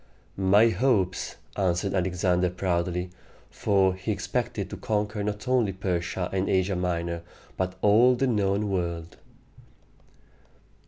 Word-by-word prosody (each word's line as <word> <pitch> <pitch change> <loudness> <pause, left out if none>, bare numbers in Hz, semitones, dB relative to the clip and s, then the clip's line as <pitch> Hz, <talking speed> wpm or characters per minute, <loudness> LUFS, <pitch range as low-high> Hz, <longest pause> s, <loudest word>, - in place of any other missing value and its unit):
"My 100 +4 +5
hopes!" 110 -7 0 0.2
answered 95 0 0
Alexander 90 -1 +1
proudly, 90 0 -1 0.4
for 95 -2 +2
he 95 - -4
expected - - -2
to - - -5
conquer 105 -1 -1
not 105 +3 -4
only 120 -6 +2
Persia 90 -1 -2
and 95 0 0
Asia 95 +1 +1
Minor, 85 -1 -2 0.3
but 95 0 -2
all 115 +5 +6
the 135 - +1
known 105 -3 +1
world. 85 -2 -3
95 Hz, 115 wpm, -26 LUFS, 90-105 Hz, 0.4 s, all